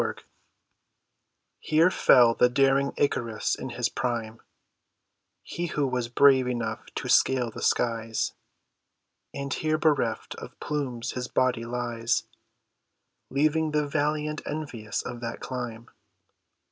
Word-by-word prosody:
ICARUS - - -4 1.4
Here 160 +4 +3
fell 120 -8 +6
the 125 - +4
daring 135 +2 +3
Icarus 115 -6 0
in 130 - -4
his 120 0 -1
prime, 115 -2 -3 1.0
He 175 0 -4
who 150 -3 0
was 125 -2 -1
brave 130 +1 +5
enough 120 -2 -3
to - - -4
scale 125 -3 +3
the - - -9
skies; 115 -1 0 1.0
And 140 -1 -4
here 155 0 0
bereft 145 -8 0
of - - -11
plumes 135 -6 -3
his 125 -1 -4
body 125 -3 +1
lies, 120 -1 -1 1.1
Leaving 155 +2 +1
the 150 0 +2
valiant 150 +1 -1
envious 125 -9 -4
of 120 - -6
that 115 -1 -5
climb. 120 -3 -6
125 Hz, 120 wpm, -27 LUFS, 115-145 Hz, 1.4 s, fell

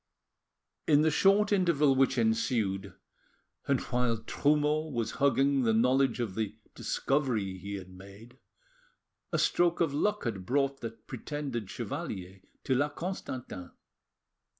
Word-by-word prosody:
In 150 -1 +5
the 160 - +3
short 200 +6 +4
interval 170 -8 +3
which 135 0 +2
ensued, 110 -4 0 0.7
and 140 -2 +2
while 125 -2 0
Trumeau 150 +6 +1
was 120 -5 -2
hugging 140 0 +3
the 115 -3 +2
knowledge 130 +2 +3
of 115 -6 -2
the 110 0 -3 0.2
discovery 115 -10 -1
he 100 +2 -5
had 95 -1 -8
made, 100 +7 -14 0.9
a - - +1
stroke 175 -1 +2
of 160 -4 +1
luck 210 +8 0
had 100 -6 -3
brought 135 +4 0
the 115 - -3
pretended 120 0 -6
chevalier 100 - -5 0.2
to 130 - +1
La 145 +3 +2
Constantin. 130 - -6
130 Hz, 125 wpm, -30 LUFS, 110-145 Hz, 0.9 s, In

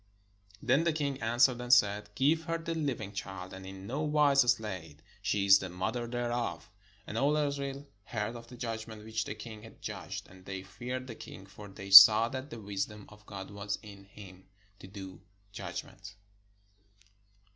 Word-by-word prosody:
Then 130 +6 +3
the 170 -1 +1
king 140 -3 -2
answered 120 +2 +3
and 125 0 -3
said: 105 -4 +4
"Give 155 +6 +2
her 165 0 -1
the 165 0 -4
living 130 -11 -3
child, 95 -2 -7
and 95 0 -9
in 95 0 -9
no 135 +8 -3
wise 150 -2 +4
slay 95 -10 -5
it: 80 - -27 0.2
she 100 -1 0
is 100 0 +8
the 95 - -5
mother 110 +7 -3
thereof." 120 -2 -3 0.3
And 110 - -3
all 145 +2 +2
Israel 140 -1 -2 0.2
heard 110 0 -3
of 115 0 -10
the 125 - -12
judgment 110 -2 -6
which 110 0 -2
the - - -5
king 110 0 -9
had 115 +1 -14
judged; - - -6
and 95 0 -16
they 95 -1 -6
feared 120 +6 -6
the 125 - -7
king: 95 -3 -11
for 100 +1 -12
they 95 0 -10
saw 105 +4 +11
that 130 +2 -6
the 115 - -8
wisdom 100 0 -4
of 105 0 -17
God 95 -1 -8
was 100 0 -4
in 100 -2 -12
him, 95 -2 -14 0.3
to - - -11
do 95 -1 -10 0.3
judg - - -5
ment. - - -13
110 Hz, 185 wpm, -31 LUFS, 100-130 Hz, 0.3 s, saw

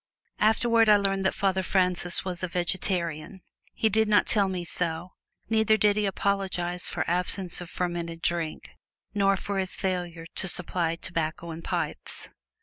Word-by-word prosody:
Afterward 225 +1 +3
I 210 - +7
learned 195 -1 0
that 190 - +1
Father 190 -1 +1
Francis 180 -1 +2
was 180 -2 -3
a 185 - -1
vegetarian. 175 -1 -2 0.3
He 220 - +2
did 220 +1 +2
not 210 -1 +4
tell 200 -3 +3
me 180 -2 -4
so, 170 +1 -1 0.4
neither 220 -1 +3
did 210 0 +3
he 210 -1 0
apologize 190 -3 -1
for - - -3
absence 180 +1 -1
of 175 - -8
fermented 170 -2 -3
drink, 170 -2 -2 0.4
nor 195 -1 +2
for 200 +1 -3
his 185 -1 +2
failure 175 -3 -3
to - - +2
supply 175 -2 +1
tobacco 170 -1 -4
and 165 +1 -8
pipes. - - -3
185 Hz, 155 wpm, -26 LUFS, 175-200 Hz, 0.4 s, I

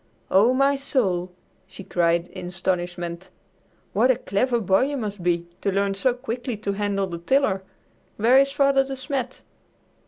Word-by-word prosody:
"Oh, 205 +6 +5
my 275 +2 +3
soul!" 195 -10 -1 0.4
she 190 +1 -11
cried 170 -1 +1
in - - -8
astonishment. 175 -1 -3 0.6
"What 235 +5 +3
a 260 - +5
clever 240 +2 0
boy 195 +3 +3
you 285 +1 -3
must 205 -5 -4
be 170 -1 0 0.2
to 200 - 0
learn 200 +1 +1
so 195 +6 +2
quickly 245 -1 -4
to 205 -1 -3
handle 200 -1 -1
the 170 -3 -6
tiller. 205 0 +1 0.6
Where 240 +5 +5
is 275 0 +3
Father 275 -1 +3
De 270 0 -6
Smet?" 260 -1 -4
205 Hz, 160 wpm, -24 LUFS, 185-260 Hz, 0.6 s, Oh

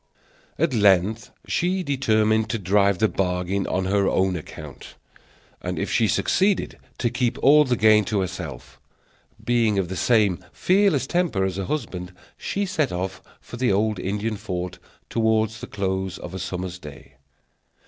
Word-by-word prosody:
At 165 -5 +1
length 105 0 +3 0.2
she 185 +2 0
determined 110 -6 +1
to 115 - -1
drive 100 0 +2
the 110 - +3
bargain 90 0 -1
on 95 0 -1
her 100 +1 +2
own 95 -1 +1
account, 80 - -9 0.7
and, - - -4
if - - -2
she - - +3
succeeded, 195 0 +1 0.2
to 120 - 0
keep 125 -1 0
all 150 +2 +7
the 125 -2 +1
gain 110 -1 +5
to 100 0 0
herself. 85 -8 -6 0.7
Being 115 -4 +2
of 95 -3 0
the 95 - -4
same 100 -1 +2
fearless 190 -6 +2
temper 170 - 0
as 95 -1 -3
her 95 - -2
husband, 90 -8 -4 0.2
she 200 +1 -2
set 160 -8 0
off 95 +1 -4 0.2
for 120 - -10
the 125 -3 +1
old 105 0 +1
Indian 105 +3 -2
fort 90 -3 -5 0.3
toward 110 -1 +1
the 115 +3 -9
close 95 -2 -2
of 90 - -9
a 95 - -5
summer's 90 0 -5
day. 75 -5 -12
105 Hz, 160 wpm, -23 LUFS, 95-120 Hz, 0.7 s, all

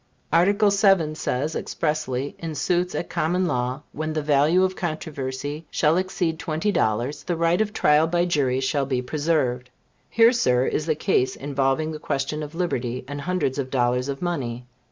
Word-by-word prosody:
Article 200 +5 +4
VII. 195 -6 +3
says, 150 0 -2
expressly, 145 -4 -2
in 165 -2 -5
suits 180 +3 0
at - - -2
common 180 +4 0
law, 125 -2 -2
when 155 +1 -3
the 155 -1 -2
value 150 +5 +4
in 185 - 0
controversy 150 -3 -4
shall 155 +1 +2
exceed 180 -3 -1
twenty 165 +5 -1
dollars, 120 - 0
the 175 - -2
right 170 +3 +2
of 215 -1 0
trial 150 -5 +3
by 175 +1 +1
jury 140 -7 +1
shall 135 0 0
be 130 -2 0
preserved. 130 -4 -1 0.4
Here, 230 +1 +5
sir, 125 - +2
is 155 +4 -2
a 155 - +3
case 150 -5 +1
involving 140 +2 0
the 155 - -6
question 150 +1 -2
of 150 +1 -7
liberty, 130 -8 -2
and 145 +1 -5
hundreds 145 -6 -1
of 130 -2 -2
dollars 125 0 +1
of 140 +4 -4
money. 125 -9 -3
155 Hz, 175 wpm, -24 LUFS, 135-175 Hz, 0.4 s, Here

